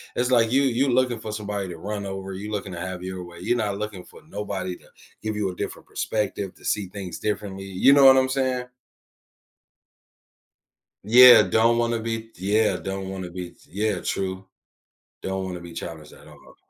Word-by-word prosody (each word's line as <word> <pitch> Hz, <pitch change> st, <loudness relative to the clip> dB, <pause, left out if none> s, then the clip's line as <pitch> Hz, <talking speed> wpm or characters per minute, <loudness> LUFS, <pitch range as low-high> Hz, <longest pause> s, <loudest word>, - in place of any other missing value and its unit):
it's 125 Hz, +1 st, +1 dB
like 115 Hz, -2 st, +4 dB
you 135 Hz, +2 st, +4 dB
you 135 Hz, +1 st, +2 dB
looking 125 Hz, -2 st, +2 dB
for 110 Hz, -, -6 dB
somebody 105 Hz, -2 st, -4 dB
to 85 Hz, -, -7 dB
run 100 Hz, +3 st, -5 dB
over, 95 Hz, 0 st, -5 dB
you 100 Hz, +3 st, -6 dB
looking 100 Hz, -3 st, -4 dB
to 85 Hz, -, -6 dB
have 95 Hz, 0 st, -5 dB
your 95 Hz, -1 st, -5 dB
way, 85 Hz, -1 st, -12 dB
you're 120 Hz, +6 st, +1 dB
not 105 Hz, -3 st, -1 dB
looking 105 Hz, -3 st, -5 dB
for -, -, -16 dB
nobody 95 Hz, -, -4 dB
to -, -, -22 dB, 0.4 s
give 110 Hz, -1 st, -2 dB
you 105 Hz, -2 st, 0 dB
a -, -, -11 dB
different -, -, -6 dB
perspective, 100 Hz, -3 st, -2 dB
to -, -, -17 dB
see 105 Hz, -2 st, 0 dB
things 95 Hz, -2 st, -7 dB
differently, 100 Hz, -2 st, -3 dB
you 95 Hz, +8 st, +4 dB
know 140 Hz, -1 st, +7 dB
what 135 Hz, 0 st, +9 dB
I'm 130 Hz, 0 st, +3 dB
saying? 130 Hz, -2 st, 0 dB, 2.4 s
Yeah, 120 Hz, +2 st, +9 dB
don't 110 Hz, +5 st, +3 dB
wanna 120 Hz, 0 st, +1 dB
be 115 Hz, 0 st, -4 dB
yeah, 105 Hz, +4 st, +2 dB
don't 95 Hz, 0 st, -5 dB
wanna 95 Hz, -2 st, -6 dB
be 90 Hz, 0 st, -6 dB
t -, -, -25 dB
yeah, 105 Hz, -1 st, 0 dB
true. 95 Hz, 0 st, -3 dB, 0.8 s
Don't 95 Hz, 0 st, -3 dB
wanna 90 Hz, -2 st, -6 dB
be 85 Hz, 0 st, -10 dB
challenged 80 Hz, -2 st, -8 dB
at -, -, -16 dB
all. -, -, -17 dB
100 Hz, 190 wpm, -24 LUFS, 95-115 Hz, 2.4 s, what